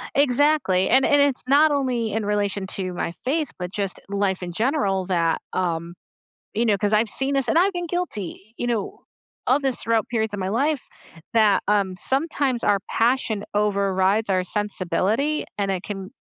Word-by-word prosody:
Exactly, 280 -8 +3
and 265 +1 +5
and 290 - +4
it's 280 -2 +2
not 295 +3 +5
only 250 -6 0
in 220 0 -1
relation 205 -1 -1
to 185 -1 -4
my 170 - -3
faith, 290 - -2
but 180 -1 -5
just 200 -3 -2
life 195 -2 -1
in 175 - -5
general 200 - 0
that 170 -3 +1
um, 170 -1 -2 0.6
you 225 +3 +1
know, 215 -3 +3
'cause 205 +2 0
I've 215 +1 +3
seen 270 +6 0
this, 275 -2 +1
and 325 - +3
I've 385 +3 +3
been 350 -1 -3
guilty, 225 - -4
you - - -3
know, 225 -4 -2 0.5
of 275 +3 +3
this 265 -2 0
throughout 225 -1 0
periods 220 -3 -1
of - - -3
my 185 - -2
life 275 +7 0 0.5
that, 215 -3 +4
um, 200 -3 +2
sometimes 270 - -1
our 205 -1 +3
passion 225 -3 +1
overrides 200 0 +1
our 185 -1 +2
sensibility, 210 - -1
and 200 -1 0
it 185 -2 -2
can 195 -2 -6
210 Hz, 175 wpm, -23 LUFS, 195-265 Hz, 0.6 s, and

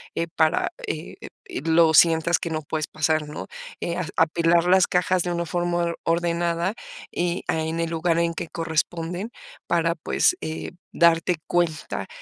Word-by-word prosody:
eh, 165 - -1
para, 160 -1 +2 0.2
eh, - - -5 0.3
em, - - -6
lo 165 0 +4
sientas 165 +2 +5
que 170 - -4
no 155 -1 -2
puedes 155 +1 -3
pasar, 155 0 0
¿no? 150 - -7 0.3
Eh, 170 0 -2
ah, 180 - -2
apilar 165 +1 +3
las 185 +1 +5
cajas 180 0 +1
de 175 - -2
una 170 0 -2
forma 175 +1 -1
or 170 0 -3
ordenada 170 +2 0 0.4
y 175 +1 -1
a 160 - 0
en 160 +1 -3
el 165 -1 -1
lugar 165 0 +1
en 170 0 +1
que 165 - -5
corresponden 165 +4 -2 0.4
para, - - +1
pues, 360 - +2
eh, 160 +3 -5 0.2
darte 170 0 +3
cuenta 170 -3 -1
170 Hz, 165 wpm, -24 LUFS, 160-175 Hz, 0.4 s, sientas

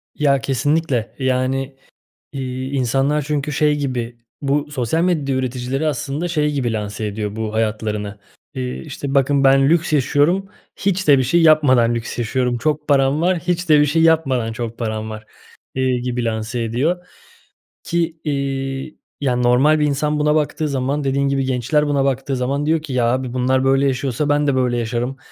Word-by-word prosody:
Ya, 140 -2 +2
kesinlikle. 135 -4 0
Yani, 130 +1 -1 0.6
iii, 130 -1 -4
insanlar 135 +3 +1
çünkü 150 0 -2
şey 150 +1 +2
gibi, 125 -5 -3 0.2
bu 145 +1 -1
sosyal 145 +5 0
medya 150 -7 0
üreticileri, 130 +3 -2
aslında, 145 +4 -2
şey 150 -3 0
gibi 125 -5 -1
lanse 105 0 -4
ediyor 105 0 -4
bu 110 -1 -4
hayatlarını, 105 -2 -2 0.3
eee, 65 0 -4
işte, 140 - -6
bakın 140 0 +3
ben 135 +1 +5
lüks 160 -1 +2
yaşıyorum, 150 +8 +2 0.3
hiç 190 -3 -1
de 140 -2 +7
bir 130 - +2
şey 170 +7 +2
yapmadan 130 -7 +4
lüks 115 +1 -5
yaşıyorum. 120 +1 0
Çok 150 +3 -1
param 140 +1 +3
var, 180 0 +2
hiç 175 +1 -2
de 150 -1 +6
bir 150 - +5
şey 160 +3 +1
yapmadan 135 -8 +2
çok 115 0 -5
param 110 -1 -3
var, 110 0 -8 0.5
eee, 130 -1 +1
gibi 125 -1 -2
lanse 115 +1 -2
ediyor 155 +11 -1 0.8
ki, 170 -1 -1
iii, 135 0 -3 0.2
yani, 125 -3 0
normal 130 +6 +4
bir 150 - +2
insan 150 +1 0
buna 150 0 +2
baktığı 150 0 0
zaman, 140 +2 -1
dediğin 140 +1 +1
gibi 135 -1 0
gençler 130 +4 +1
buna 140 -2 +1
baktığı 135 0 -1
zaman 135 +3 -1
diyor 160 0 +1
ki 150 - -7
ya 125 -2 +2
abi 130 -1 -2
bunlar 130 +1 +1
böyle 135 +1 +3
yaşıyorsa 135 +2 -1
ben 145 0 +2
de 140 - +2
böyle 125 -2 +1
yaşarım 120 +3 -2
135 Hz, 175 wpm, -19 LUFS, 125-150 Hz, 0.8 s, de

